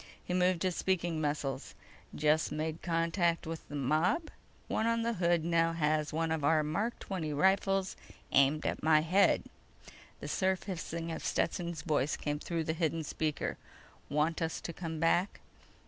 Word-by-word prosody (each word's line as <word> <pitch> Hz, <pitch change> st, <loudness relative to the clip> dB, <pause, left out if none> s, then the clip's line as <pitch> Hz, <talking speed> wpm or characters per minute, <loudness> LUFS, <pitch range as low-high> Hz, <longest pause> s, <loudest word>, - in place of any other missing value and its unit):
He 180 Hz, -, -3 dB
moved 180 Hz, -1 st, +2 dB
his 185 Hz, -2 st, 0 dB
speaking 175 Hz, -4 st, 0 dB
muscles: 145 Hz, -2 st, -2 dB, 0.4 s
"Just 150 Hz, +1 st, +2 dB
made 155 Hz, +1 st, -3 dB
contact 170 Hz, 0 st, +1 dB
with 165 Hz, 0 st, -6 dB
the 145 Hz, -, -7 dB
mob. 155 Hz, -, +1 dB, 0.4 s
One 220 Hz, -, 0 dB
on 230 Hz, 0 st, +1 dB
the 235 Hz, 0 st, 0 dB
hood 175 Hz, -4 st, +1 dB
now 165 Hz, -1 st, +2 dB
has 155 Hz, -1 st, +1 dB
one 160 Hz, +1 st, -1 dB
of 160 Hz, -2 st, -1 dB
our 155 Hz, +1 st, +4 dB
Mark 200 Hz, +11 st, -1 dB
XX 160 Hz, -7 st, -3 dB
rifles 195 Hz, +2 st, +2 dB, 0.4 s
aimed 140 Hz, +3 st, +4 dB
at -, -, -1 dB
my 155 Hz, -1 st, +5 dB
head." 180 Hz, +5 st, +3 dB, 0.8 s
The -, -, -6 dB
surf 190 Hz, -1 st, 0 dB
hissing 170 Hz, -3 st, -4 dB
of -, -, -5 dB
Stetson's 170 Hz, -4 st, -1 dB
voice 150 Hz, -3 st, +1 dB
came 145 Hz, 0 st, -2 dB
through 165 Hz, 0 st, -2 dB
the 160 Hz, -, -1 dB
hidden 165 Hz, -1 st, -1 dB
speaker: 155 Hz, 0 st, -2 dB, 0.5 s
_"Want 155 Hz, +3 st, +1 dB
us 160 Hz, 0 st, -1 dB
to 170 Hz, -, -5 dB
come 165 Hz, -2 st, -5 dB
back?" 175 Hz, +4 st, +2 dB
165 Hz, 165 wpm, -32 LUFS, 155-180 Hz, 0.8 s, my